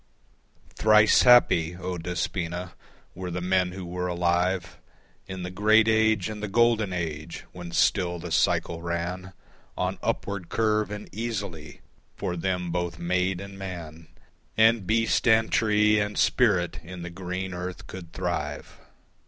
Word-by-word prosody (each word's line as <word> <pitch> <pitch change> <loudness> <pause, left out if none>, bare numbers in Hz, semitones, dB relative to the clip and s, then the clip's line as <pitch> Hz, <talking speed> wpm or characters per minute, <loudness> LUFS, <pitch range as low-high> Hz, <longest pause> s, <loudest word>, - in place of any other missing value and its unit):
Thrice 110 0 +5
happy, 90 -9 +5
O 90 0 -4
Despoina, 90 0 -3 0.4
were 90 0 -6
the 90 +1 -3
men 90 0 +1
who 95 -1 -7
were 90 +1 -3
alive 90 0 0 0.5
In 95 -1 -6
the 90 - -5
great 110 +3 +4
age 110 -3 +3
and 105 -1 -6
the 105 - -3
golden 110 -1 +2
age 80 -2 -5
when 90 -1 -9
still 90 0 +2
the 85 - -7
cycle 85 -1 +1
ran 85 +2 -4 0.4
On - - -2
upward 100 -4 -3
curve 110 -1 +1
and 105 0 -7
easily, 100 -9 -5 0.3
for 90 - -3
them 90 0 -2
both 85 0 -2
maid 90 +1 0
and 100 0 -9
man 85 -4 -8 0.5
And 110 -3 +4
beast 115 +3 +1
and 110 -1 +4
tree 105 -1 +3
and 105 0 -2
spirit 95 -8 +2
in 90 +1 -8
the 85 - -6
green 90 +1 -5
earth 90 +1 -6
could 85 -3 -10
thrive. 90 0 -4
90 Hz, 145 wpm, -26 LUFS, 85-105 Hz, 0.5 s, Thrice